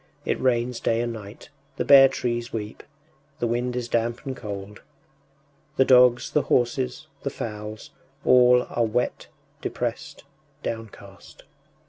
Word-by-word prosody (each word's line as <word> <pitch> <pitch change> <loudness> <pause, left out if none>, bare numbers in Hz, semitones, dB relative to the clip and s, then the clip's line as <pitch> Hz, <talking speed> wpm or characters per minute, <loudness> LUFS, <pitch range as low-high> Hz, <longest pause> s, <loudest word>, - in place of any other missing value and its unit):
It - - -1
rains 125 -1 0
day 115 - 0
and 120 0 -2
night, 105 0 -11 0.3
the - - -2
bare 135 -1 +9
trees 120 -2 -3
weep, 105 -1 -6 0.6
the - - -2
wind 120 +1 -1
is 125 -1 -3
damp 120 +2 -1
and 135 -1 -4
cold. 100 -2 -8 1.0
The 135 - +5
dogs, 125 -2 +5
the 150 - +2
horses, 125 +4 0 0.2
the 140 - -2
fowls 105 -3 -7 0.3
all 125 0 +5
are 120 - +1
wet, 115 +2 -1 0.3
depressed, - - -4 0.4
downcast. 105 -4 -8
120 Hz, 130 wpm, -24 LUFS, 110-125 Hz, 1.0 s, bare